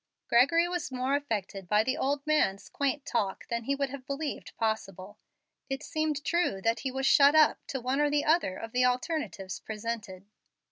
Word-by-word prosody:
Gregory 290 +9 +4
was 350 -5 -3
more 260 +2 0
affected 205 -9 -3
by 210 +1 +4
the 260 +3 0
old 280 -1 -1
man's 300 -11 +1
quaint 280 0 -1
talk 200 -5 -2
than 235 -1 -2
he 280 - +1
would 275 -1 -2
have 275 -2 -7
believed 285 +1 -5
possible. 205 -2 -3 0.5
It 270 +2 -3
seemed 310 -2 -2
true 340 - 0
that 225 +4 0
he 270 - -2
was 265 +1 -3
"shut 280 +2 +6
up" 310 -1 +5
to 270 - -3
one 260 +4 0
or 295 - +3
the 290 0 +1
other 310 - +2
of 225 - -7
the 250 +1 +2
alternatives 250 - -1
presented. 215 -3 -6
265 Hz, 185 wpm, -29 LUFS, 220-290 Hz, 0.5 s, shut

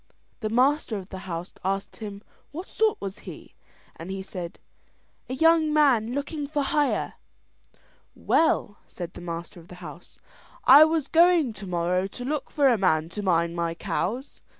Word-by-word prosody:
The 215 - -2
master 255 0 +2
of 190 0 -9
the 190 - -7
house 170 +2 -5
asked 195 +1 -2
him 205 -2 -8 0.3
what 345 +6 -7
sort 435 -1 +1
was 195 -1 -6
he, - - -11 0.4
and 165 - -9
he 190 0 -4
said: 180 -3 -7 0.7
"A 255 - -2
young 320 +1 +4
man 260 -7 +3
looking 285 +1 -3
for 295 -1 -1
hire." 290 +1 0 1.0
"Well," 210 -9 +1
said 175 -1 -7
the - - -10
master 170 0 -6
of 165 - -16
the 180 - -11
house, 175 -1 -11 0.5
"I 290 +4 +9
was 315 -2 0
going 335 -6 +4
tomorrow 180 -1 -1
to 245 +5 -8
look 300 +2 -3
for 285 -3 +3
a 240 -5 +3
man 160 -4 +2
to 205 +4 -5
mind 170 -3 +1
my 170 -1 -2
cows. 245 +10 -3
210 Hz, 165 wpm, -26 LUFS, 180-290 Hz, 1.0 s, I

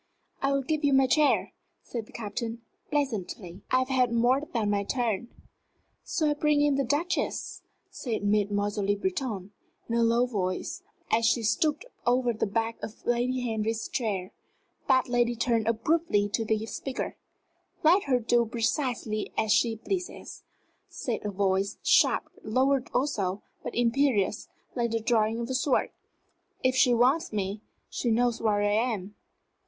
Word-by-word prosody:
"I 275 - +2
will 275 0 +1
give 310 +3 -1
you 285 -1 +3
my 270 0 +5
chair," 295 +3 +2 0.3
said 230 -3 -5
the - - -16
Captain, 230 +1 -5 0.3
pleasantly. 210 - -3
"I 255 - +3
have 255 +1 0
had 255 -2 +2
more 240 +4 +3
than 215 -4 0
my 200 -1 +1
turn." 235 0 -1 0.8
"Shall 310 -5 +1
I - - +3
bring 295 0 +2
in 290 -1 +3
the 275 0 +1
Duchess?" 295 +7 -1 0.3
said 225 -5 -4
Mademoiselle 205 0 +1
Le 205 +1 +2
Breton, 200 0 -3 0.4
in 230 - -3
a 235 - +3
low 235 +1 +3
tone, 190 -7 -2 0.5
as 230 +1 +3
she 235 0 +2
stooped 300 - +1 0.2
over 245 -1 +3
the 220 - -1
back 225 +3 -2
of 220 - -8
Lady 245 +2 +1
Henry's 225 -1 -2
chair. 205 -8 -2 0.6
That 260 -2 +4
lady 240 -1 +1
turned 230 -1 +1
abruptly 230 -3 +1
to 225 +2 -1
the 220 0 0
speaker. 260 +3 -4 0.7
"Let 350 +6 +5
her 265 -3 +3
do 240 +1 +3
precisely 230 -2 -1
as 220 -1 +1
she 225 +1 +3
pleases," 360 - -5 0.5
said 275 -10 -4
a 210 - -2
voice, 195 0 0
sharp, - - +4 0.2
lowered 260 +3 +1
also, 205 -8 -1 0.2
but - - -6
imperious, 240 -3 +1 0.3
like 240 -2 0
the 230 0 0
drawing 225 0 +1
of 235 - -4
a - - 0
sword. 260 +1 +1 0.7
"If 255 0 +3
she 255 -1 +5
wants 255 +8 +3
me, 205 0 -2 0.3
she 240 - -2
knows 235 +1 +1
where 210 -2 +2
I 205 - +2 0.2
am." 200 0 -6
235 Hz, 160 wpm, -28 LUFS, 215-260 Hz, 0.8 s, my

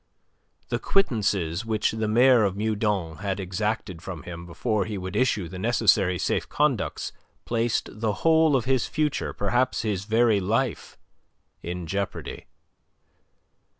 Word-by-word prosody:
The - - -1
quittances 100 - +1
which 110 -1 0
the 110 -1 -2
Mayor 120 +2 +5
of 100 -1 0
Meudon 105 -6 -1
had 100 0 -3
exacted 95 -1 -3
from 85 -6 -7
him 85 0 -8
before 95 +4 -1
he 105 -2 -4
would 95 +1 -6
issue 105 -6 +1
the 90 +2 -8
necessary 100 -4 +3
safe - - -1
conducts 145 -7 0 0.3
placed 115 -1 0
the 110 -2 +1
whole 160 -2 +5
of 125 -4 +1
his 130 -3 +1
future, 155 -2 -1
perhaps 120 +5 0
his 100 -4 -2
very 110 -1 +3
life, 115 +6 -1 0.6
in 90 0 -5
jeopardy. 100 +4 -4
105 Hz, 135 wpm, -25 LUFS, 95-120 Hz, 0.6 s, Mayor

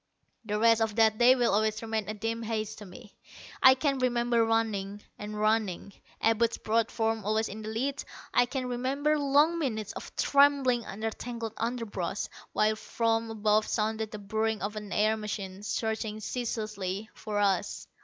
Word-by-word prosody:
The 210 -1 -1
rest 230 +1 +4
of 220 -2 0
that 220 -1 +4
day 250 +2 +7
will 240 -5 +2
always 215 +1 +1
remain 220 -2 -2
a 215 - -3
dim 225 +2 -3
haze 220 -1 -3
to 210 - -10
me. 205 +4 -13 0.5
I 260 0 +8
can 275 0 0
remember 240 -2 +2
running, 210 -3 -1 0.2
running, 210 -2 -1 0.3
Abud's 225 +1 +2
broad 225 +1 +1
form 225 -1 -1
always 215 +2 +1
in 215 +2 -7
the 215 - -6
lead. 270 +6 -2 0.3
I 245 - +4
can 255 0 -3
remember 275 +5 0
long 290 +4 +3
minutes 220 -8 -2
of - - -9
trembling 275 -4 +3
under 220 +3 -3
tangled 230 -1 -6
underbrush, 225 -5 -3 0.3
while 215 0 +2
from 225 +1 -1
above 215 -1 +2
sounded 220 0 -1
the 210 - -7
burring 220 +1 -1
of 205 +1 -3
an 210 -1 -7
air 215 +1 +2
machine 200 -3 -5
searching 220 +1 -2
ceaselessly 215 -4 -4
for 210 -1 -5
us. 200 -2 0
220 Hz, 165 wpm, -29 LUFS, 210-235 Hz, 0.5 s, I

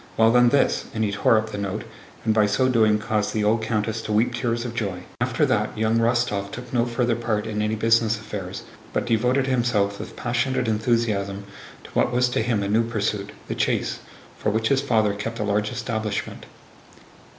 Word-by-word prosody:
Well 115 0 +5
then, 120 0 +5
this!" 140 +2 +2
and 110 - 0
he 105 - 0
tore 105 +2 +3
up 110 0 -2
the 105 - -4
note, 100 +1 -3 0.4
and 110 - +3
by 110 -1 +4
so 130 +6 +2
doing 110 -4 +4
caused 105 -1 -1
the 105 - +1
old 110 +2 +2
countess 110 0 -1
to 110 - -5
weep 110 +3 +2
tears 120 0 -1
of 120 - -4
joy. 100 -6 -3 0.2
After - - +2
that, - - 0
young 110 +1 +2
Rostóv 115 -4 +1
took 125 +2 -8
no 120 -1 +2
further 120 0 0
part 110 -3 -1
in 105 -1 -2
any 105 +1 0
business 115 0 +3
affairs, 100 -3 -6 0.3
but - - 0
devoted 125 +3 +2
himself 115 -6 +1
with - - -8
passionate 120 +1 -1
enthusiasm 105 -3 0 0.4
to - - -13
what - - +1
was 125 0 +2
to 120 - 0
him 110 -3 0
a - - -1
new 110 +3 +3
pursuit—the 105 -3 -3
chase—for - - -3
which 110 +2 0
his 135 -1 +3
father 110 -6 +2
kept 115 +3 -5
a 110 - -2
large 105 0 0
establishment. 110 -4 -4
110 Hz, 195 wpm, -24 LUFS, 105-120 Hz, 0.4 s, Well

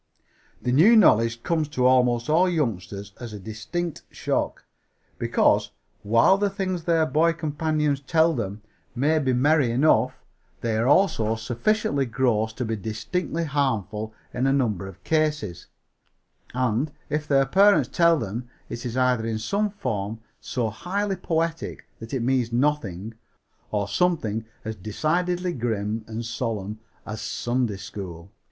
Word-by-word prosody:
The 125 - -1
new 175 - +6
knowledge 115 - +4
comes 160 -3 0
to 130 -4 -1
almost 125 -1 +3
all 170 +4 +4
youngsters 100 - -2
as 120 -3 -7
a 105 - -7
distinct 110 - -4
shock, - - -2 0.5
because, - - +2 0.3
while 115 - +4
the 205 0 +2
things 185 -4 -3
their 165 -2 +3
boy 160 +2 +3
companions 155 -2 0
tell 160 +3 +3
them 105 -5 -4 0.3
may 150 +5 +2
be 135 -3 +1
merry 140 +1 +3
enough, 125 -1 +3 0.5
they 115 -2 0
are 115 +3 +1
also 140 - +3
sufficiently 135 - 0
gross 115 -3 +1
to 125 - -3
be 110 0 -1
distinctly 150 - -3
harmful 110 - -1 0.2
in 125 +2 0
a - - +3
number 110 -9 0
of 95 - -12
cases; 150 - -1 0.9
and, 125 +3 0 0.2
if 150 0 -1
their 135 -1 +4
parents 200 +8 +5
tell 170 -1 +4
them 120 0 -4 0.2
it 120 - -6
is 125 0 -4
either 125 -3 +2
in 110 -1 -1
some 200 - 0
form 110 - -3 0.2
so 125 -8 -2
highly 195 - -2
poetic 165 -2 -2
that 115 0 -9
it 130 -4 -1
means 125 -2 +1
nothing, 115 -7 0 0.6
or 105 -1 0
as 100 - -7
something 115 - +1 0.4
decidedly 175 - 0
grim 110 -3 -2
and 115 +1 -5
solemn 110 -3 -3 0.3
as 110 -1 -6
Sunday 120 -4 -1
School. 95 -2 -8
125 Hz, 145 wpm, -25 LUFS, 110-160 Hz, 0.9 s, new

